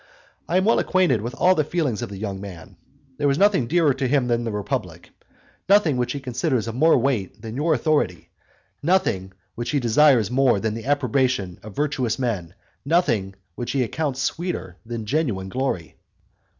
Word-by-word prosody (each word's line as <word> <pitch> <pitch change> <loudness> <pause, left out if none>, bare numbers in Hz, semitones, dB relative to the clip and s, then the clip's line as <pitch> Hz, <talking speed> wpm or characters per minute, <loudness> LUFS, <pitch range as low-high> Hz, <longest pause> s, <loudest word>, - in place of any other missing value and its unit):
I 175 - +2
am 190 - +2
well 225 - +4
acquainted 180 - +2
with 120 +4 -5
all 185 +5 +4
the 155 - +1
feelings 145 - -1
of - - -4
the 100 - -8
young 100 -1 -4
man: 95 -1 -10 0.4
there 145 -1 +2
is 140 - +1
nothing 195 - +3
dearer 160 -2 +3
to 130 0 -2
him 135 -1 +2
than 120 -1 0
the 115 - -2
republic, 105 -1 -4 0.6
nothing 195 -8 +5
which 125 -1 -1
he 140 - -4
considers 125 -2 -1
of 115 - -3
more 160 +6 +4
weight 120 -7 -1
than 115 0 -7
your 155 +3 +2
authority; 150 +4 0 0.5
nothing 145 - +1 0.2
which 120 0 -5
he 145 - +1
desires 120 -2 +4
more 130 -4 +3
than 110 +1 -1
the 115 +1 -6
approbation 125 -9 0
of 105 0 -11
virtuous 135 -6 -1
men; 100 -9 -3 0.3
nothing 115 - +1 0.2
which 120 +7 -4
he 135 -2 +2
accounts 135 +1 -2
sweeter 170 - -3
than 115 -1 -5
genuine 110 -8 -1
glory. 95 - -3
125 Hz, 180 wpm, -23 LUFS, 110-150 Hz, 0.6 s, nothing